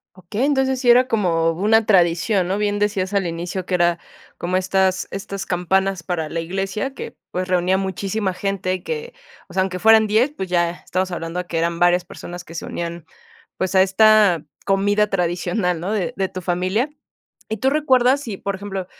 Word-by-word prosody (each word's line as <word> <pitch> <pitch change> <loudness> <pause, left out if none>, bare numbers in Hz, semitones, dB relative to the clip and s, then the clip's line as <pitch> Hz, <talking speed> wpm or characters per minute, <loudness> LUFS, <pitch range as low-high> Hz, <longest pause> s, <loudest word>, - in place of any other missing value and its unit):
Okey, 195 +7 -3
entonces 265 -2 +1
sí 245 - +2
era 250 +1 +6
como 170 -8 +1
una 210 +6 +2
tradición, 185 0 +3
¿no?, 190 +2 -1
bien 205 0 0
decías 200 -2 -1
al 195 -3 +1
inicio 170 +2 -4
que 185 - 0
era 175 -1 +2 0.4
como 180 +2 0
estas 190 0 +1
estas 195 0 -5
campanas 190 +1 0
para 165 -2 -3
la 165 - -3
iglesia 195 +9 -3
que, - - -7 0.2
pues, 185 0 -2
reunía 180 0 +2
a - - +2
muchísima 195 +1 -2
gente 185 -1 -2
que, 475 0 -5 0.3
o - - -14
sea, 190 - +2
aunque 185 -1 -2
fueran 220 +2 +6
10, 225 +7 +2
pues, 190 -8 -5
ya 175 -1 +2
estamos 185 +1 -3
hablando 175 +1 -4
que 170 -2 -2
eran 170 0 0
varias 175 0 +4
personas 175 0 -9
que 165 - -12
se - - -5
unían, 170 -1 -5 0.5
pues 190 +1 -2
a 190 - +7
esta 195 -3 +4 0.2
comida 205 +2 +2
tradicional, 180 0 -1
¿no?, 180 +5 -3
de 200 -6 -1
de 190 0 -1
tu 185 - -6
familia. 185 - 0 0.6
¿Y 220 - -3
tú 265 - +1
recuerdas 270 -3 +3
si, 215 -8 -6
por 200 - -3
ejemplo, 195 -1 -5
190 Hz, 190 wpm, -21 LUFS, 175-210 Hz, 0.6 s, a